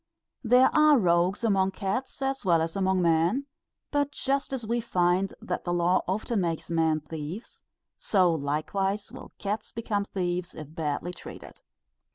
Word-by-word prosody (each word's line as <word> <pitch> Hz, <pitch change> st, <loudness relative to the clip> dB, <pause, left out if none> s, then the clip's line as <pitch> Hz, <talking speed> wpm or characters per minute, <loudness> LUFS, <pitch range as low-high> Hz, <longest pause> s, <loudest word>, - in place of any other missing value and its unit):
There 250 Hz, +2 st, +5 dB
are 305 Hz, -1 st, +6 dB
rogues 180 Hz, 0 st, +2 dB
among 195 Hz, -3 st, +2 dB
cats 230 Hz, +9 st, -3 dB
as 270 Hz, 0 st, -1 dB
well 170 Hz, -4 st, +4 dB
as 165 Hz, 0 st, -4 dB
among 190 Hz, -1 st, +1 dB
men; 170 Hz, +11 st, +2 dB, 0.5 s
but 290 Hz, -1 st, +1 dB
just 275 Hz, -1 st, -1 dB
as 260 Hz, -4 st, -3 dB
we 235 Hz, +2 st, 0 dB
find 185 Hz, -2 st, +1 dB
that -, -, -4 dB
the 175 Hz, -, -2 dB
law 175 Hz, +1 st, +2 dB
often 210 Hz, +3 st, -1 dB
makes 170 Hz, -1 st, -3 dB
men 160 Hz, -2 st, +2 dB
thieves, 160 Hz, +7 st, -7 dB, 0.4 s
so 185 Hz, -4 st, +3 dB
likewise 190 Hz, +8 st, -2 dB
will -, -, -11 dB
cats 205 Hz, +1 st, -3 dB
become 215 Hz, -3 st, -2 dB
thieves 180 Hz, -2 st, -3 dB
if 155 Hz, 0 st, -9 dB
badly 160 Hz, +2 st, -3 dB
treated. -, -, -11 dB
190 Hz, 155 wpm, -27 LUFS, 170-225 Hz, 0.5 s, are